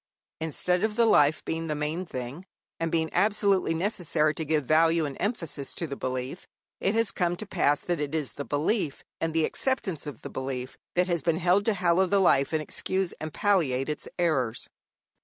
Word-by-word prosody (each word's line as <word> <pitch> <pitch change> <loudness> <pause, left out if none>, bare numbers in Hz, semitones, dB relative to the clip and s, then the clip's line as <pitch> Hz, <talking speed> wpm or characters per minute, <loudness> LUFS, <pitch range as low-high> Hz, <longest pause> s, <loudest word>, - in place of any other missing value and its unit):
Instead 180 +3 0
of 220 -1 0
the 235 - +4
life 150 -8 +4
being 165 0 -2
the 150 - -1
main 155 +5 -2
thing, 130 +5 -6 0.4
and 165 -1 -1
being 160 -1 0
absolutely 200 -5 +2
necessary 165 -4 +1
to 160 - -4
give 155 -2 0
value 160 +2 +4
and 140 -2 -5
emphasis 165 - -2
to 170 - -2
the 140 -3 -5
belief, 130 +5 -4 0.3
it 195 +3 +1
has 225 -3 +2
come 175 -2 0
to 215 - -6
pass 155 -7 +1
that 175 -3 -2
it 150 +1 -2
is 150 -4 -2
the 140 - -5
belief, 150 +2 -1 0.2
and 165 - -1
the 160 -1 +2
acceptance 200 - -2
of 145 -6 -8
the - - -5
belief, 130 -1 -4 0.2
that 180 +1 +3
has 175 -3 0
been 160 +3 +1
held 180 +4 +3
to 225 - +2
hallow 180 0 +3
the 200 - +2
life 140 -7 +4
and 155 -1 0
excuse 190 +4 -2
and 155 0 -5
palliate 150 -9 +1
its 150 - -4
errors. 135 -10 0
165 Hz, 195 wpm, -27 LUFS, 145-185 Hz, 0.4 s, the